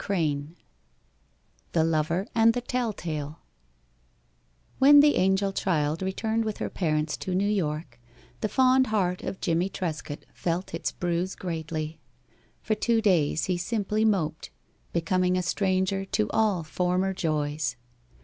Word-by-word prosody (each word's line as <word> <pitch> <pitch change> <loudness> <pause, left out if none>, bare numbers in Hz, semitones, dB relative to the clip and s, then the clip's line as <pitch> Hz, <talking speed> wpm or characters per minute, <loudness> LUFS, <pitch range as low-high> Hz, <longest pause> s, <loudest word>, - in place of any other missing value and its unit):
III 150 -7 0 1.3
THE 160 - +3
LOVER 165 +3 0
AND 230 0 +4
THE 245 - -1
TELLTALE 175 - -3 1.4
When 285 +2 +8
the 295 +1 +6
angel 190 +1 +2
child 155 -4 0
returned 220 +4 -1
with 215 -2 -3
her - - -4
parents 155 -3 0
to 185 - -3
New 200 +2 +2
York, 150 -10 -2 0.4
the 215 - -1
fond 260 +1 +4
heart 185 -4 0
of 190 - -5
Jimmie 170 +2 0
Trescott 155 -6 -5
felt 175 +1 -3
its 165 - -2
bruise 175 +1 -2
greatly. 160 -2 -4 0.6
For 215 - +1
two 225 +2 +1
days 170 -8 +2
he 180 -1 0
simply 210 +2 -1
moped, 180 -7 0 0.4
becoming 180 +2 +1
a 180 - 0
stranger 190 +1 0
to 105 - 0
all 210 -6 +2
former 180 +5 0
joys. 150 -7 -1
180 Hz, 130 wpm, -27 LUFS, 160-205 Hz, 1.4 s, When